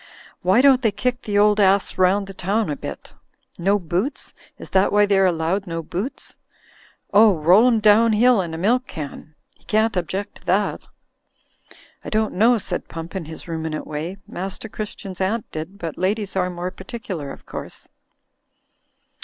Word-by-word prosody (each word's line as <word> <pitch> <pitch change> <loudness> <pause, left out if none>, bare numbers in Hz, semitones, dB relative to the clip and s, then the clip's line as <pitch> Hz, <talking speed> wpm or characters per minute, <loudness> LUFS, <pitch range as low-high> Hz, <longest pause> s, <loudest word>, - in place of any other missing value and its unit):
Why 190 +7 +4
don't 270 -2 +6
they 225 -4 +2
kick 250 +4 -2
the 205 -1 -2
old 210 +1 +4
ass 195 0 +3
round 190 +2 +3
the 195 - -9
town 195 0 -1
a - - -2
bit? 70 - -8 0.5
No 195 +4 +3
boots? 185 - -2 0.2
Is - - -10
that 190 +1 +3
why 205 0 +5
they're 195 -2 +3
allowed 175 +3 -1
no 165 -1 -4
boots? 190 - -5 0.7
Oh, 210 -1 +7
roll 180 +9 +5
him 235 -3 +3
down 215 +2 +5
hill 235 0 +4
in 165 -3 -5
a - - -5
milk 240 +9 +1
can; 150 0 -8 0.2
he - - -31
can't 220 0 +1
object 185 +3 -3
to - - -24
that." 195 +2 +1 1.2
"I - - -6
don't 220 0 0
know," 230 +5 +4
said 210 - -4
Pump, 165 +2 -8
in 185 -4 -3
his 160 +2 -9
ruminant 160 -2 -4
way, 160 +5 -5
"Master 190 +4 -5
Christian's 200 -3 -7
aunt 210 +4 0
did, 160 +5 -6
but 165 -5 -6
ladies 200 +2 -1
are 180 -1 +1
more 180 +1 -4
par 190 - -12
ticular, 185 - -6
of - - -12
course." - - -8
195 Hz, 175 wpm, -22 LUFS, 175-215 Hz, 1.2 s, Oh